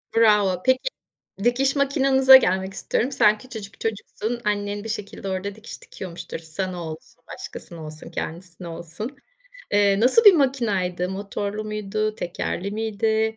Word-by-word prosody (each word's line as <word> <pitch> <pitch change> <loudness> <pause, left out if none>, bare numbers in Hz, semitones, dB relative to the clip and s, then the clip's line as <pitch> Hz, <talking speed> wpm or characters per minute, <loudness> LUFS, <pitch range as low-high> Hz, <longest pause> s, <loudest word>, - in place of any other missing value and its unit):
Bravo, 210 -5 +4
peki, 260 - +3 0.6
dikiş 265 +4 +2
makinanıza 270 -1 +6
gelmek 190 -6 +2
istiyorum. 250 +5 -1
Sen 215 -5 +4
küçücük 220 -6 -10
çocuksun, 225 +1 -3
annen 205 0 -1
bir 225 - -6
şekilde 205 -2 -5
orada 190 +2 -3
dikiş 220 - -11
dikiyormuştur, 180 -2 -7
sana 175 +2 -5
olsun, 230 +10 -12
başkasına 170 -2 -9
olsun, 155 0 -10
kendisine 175 +1 -6
olsun. 170 - -7 0.6
Eee, 200 -1 +4
nasıl 260 - +5
bir 410 - +10
makinaydı 210 - +1
motorlu 200 +2 -4
muydu, 215 0 -2
tekerli 175 +1 -3
miydi? 220 +1 0
210 Hz, 130 wpm, -24 LUFS, 190-235 Hz, 0.6 s, bir